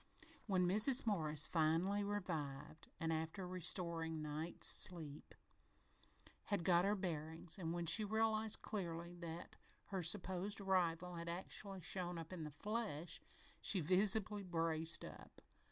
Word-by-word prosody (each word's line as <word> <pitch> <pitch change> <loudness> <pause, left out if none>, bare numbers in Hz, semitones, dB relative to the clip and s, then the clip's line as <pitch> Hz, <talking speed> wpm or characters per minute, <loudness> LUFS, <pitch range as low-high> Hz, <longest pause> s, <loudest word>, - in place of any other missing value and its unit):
When 185 -3 +2
Mrs. 220 +8 +6
Morris 155 -8 +2
had 160 -1 +3
fully 200 +2 0
revived 160 -8 -4
and, 165 0 0
after 160 +4 -3
a - - -4
restoring 170 -2 0
"night's 155 +2 -3
sleep" 155 -5 +2 1.1
had 200 -5 -1
got 175 +1 +4
her 205 +1 +2
bearings, 165 -1 -4
and 165 -3 -2
when 170 0 -2
she 215 +6 +5
realized 220 0 +1
clearly 170 -4 -4
that 170 -1 -7 0.3
her 190 -2 -2
supposed 185 +3 +2
rival 180 -2 0
had 170 0 -5
actually 190 +2 -4
shown 175 +1 -2
up 165 +2 -7
in 165 -4 -5
the - - -5
flesh, 190 0 -3 0.4
she 195 - +3
visibly 200 +5 +3
braced 165 -3 -1
up. - - -12
175 Hz, 135 wpm, -40 LUFS, 165-200 Hz, 1.1 s, Mrs